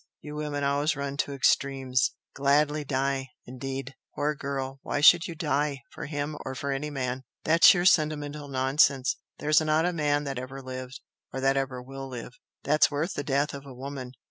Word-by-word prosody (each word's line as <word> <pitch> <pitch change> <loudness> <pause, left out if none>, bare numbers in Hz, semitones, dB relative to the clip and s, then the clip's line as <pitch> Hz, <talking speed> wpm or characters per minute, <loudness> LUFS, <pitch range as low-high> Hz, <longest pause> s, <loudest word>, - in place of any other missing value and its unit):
You 150 - -9
women 150 -1 -3
always 145 +2 +1
run 140 0 -3
to 145 - -1
extremes! 135 -2 +1 0.2
'Gladly 145 +2 +2
die' 135 -1 -1 0.2
indeed! 135 +1 -5 0.2
Poor 150 +1 0
girl, 135 -1 -4
why - - -2
should 165 +3 +7
you 170 - -6
'die' 145 -3 -1
for - - -7
him 145 0 -3
or 130 - -5
for 140 +2 -3
any 140 +2 -2
man! 130 -2 -3 0.2
That's 165 +1 +6
sheer 175 -2 +6
sentimental 150 -3 +2
nonsense! 135 0 +2 0.2
There's 150 +1 +3
not 155 +1 +2
a 180 - +1
man 145 -2 +1
that 135 -3 -3
ever 130 +2 -7
lived, 130 -1 -7 0.3
or 135 - -4
that 135 +1 +3
ever 135 -2 -2
will 135 +1 -7
live, 125 -1 -7 0.3
that's 150 +2 +4
worth 150 +5 -2
the 145 - -3
death 140 +1 0
of 140 -1 -7
a 130 - -10
woman! 130 -1 -7
140 Hz, 185 wpm, -27 LUFS, 135-150 Hz, 0.3 s, should